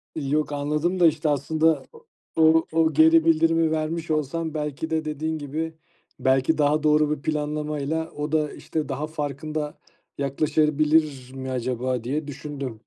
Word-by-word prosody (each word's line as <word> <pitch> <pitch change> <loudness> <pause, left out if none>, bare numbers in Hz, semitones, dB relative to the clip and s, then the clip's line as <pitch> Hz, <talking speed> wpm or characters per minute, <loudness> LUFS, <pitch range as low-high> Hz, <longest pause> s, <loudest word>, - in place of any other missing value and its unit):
Yok 150 0 -1
anladım 150 +5 -1
da, 170 - +7
işte, 155 0 +1
aslında 155 +3 +1 0.5
o 160 0 +5
o 160 -1 +2
geri 160 +2 +6
bildirimi 165 0 +3
vermiş 160 +1 -2
olsan 155 +2 -1
belki 150 +1 -3
de 160 -1 -1
dediğin 155 +1 -2
gibi 155 +3 -4 0.5
belki 130 +4 +2
daha 150 +1 +2
doğru 150 0 +3
bir - - -16
planlamayla 150 +1 -2
o 150 +1 -4
da 155 -2 0
işte 155 -2 -4
daha 140 +3 -3
farkında 150 0 -4 0.4
yaklaşabilir 150 -1 +1
mi 130 0 -5
acaba 125 0 -2
diye 145 +5 -2
düşündüm. 140 -5 -6
150 Hz, 140 wpm, -24 LUFS, 145-160 Hz, 0.5 s, da